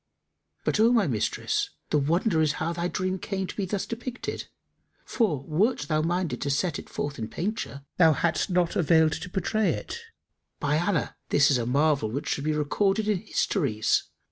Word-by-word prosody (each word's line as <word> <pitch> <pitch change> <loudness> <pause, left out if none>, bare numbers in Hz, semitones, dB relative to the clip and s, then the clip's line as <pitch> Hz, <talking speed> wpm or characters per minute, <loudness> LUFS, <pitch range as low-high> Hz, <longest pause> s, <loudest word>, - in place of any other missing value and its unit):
But, - - +1
O 225 +2 +6
my 230 -5 +4
mistress, 115 -9 -1 0.2
the 150 - +4
wonder 165 +4 +2
is 155 -2 +2
how 165 +3 -2
thy 170 +1 -1
dream 185 +1 -2
came 190 0 -3
to - - -7
be 200 - -1
thus 195 +1 -2
depicted, 245 +1 -5 0.6
for, 175 - 0
wert 195 - +1
thou 155 +1 0
minded 170 -5 -1
to 140 - -1
set 150 +3 0
it - - -11
forth 145 -2 -4
in 110 - -3
painture, 165 - -4
thou 160 -3 +6
hadst 170 +5 0
not 180 -2 +1
availed 160 -2 +4
to 180 +3 -5
portray 200 +3 0
it. 470 - -3 0.6
By 150 +1 +1
Allah, 175 -2 0
this 140 0 +4
is 130 - +3
a 115 - -2
marvel 140 -2 +2
which 140 +7 -4
should 140 - -1
be 155 - +1
recorded 195 +8 +1
in 210 -3 +2
histories! 140 - 0
165 Hz, 185 wpm, -27 LUFS, 145-195 Hz, 0.6 s, O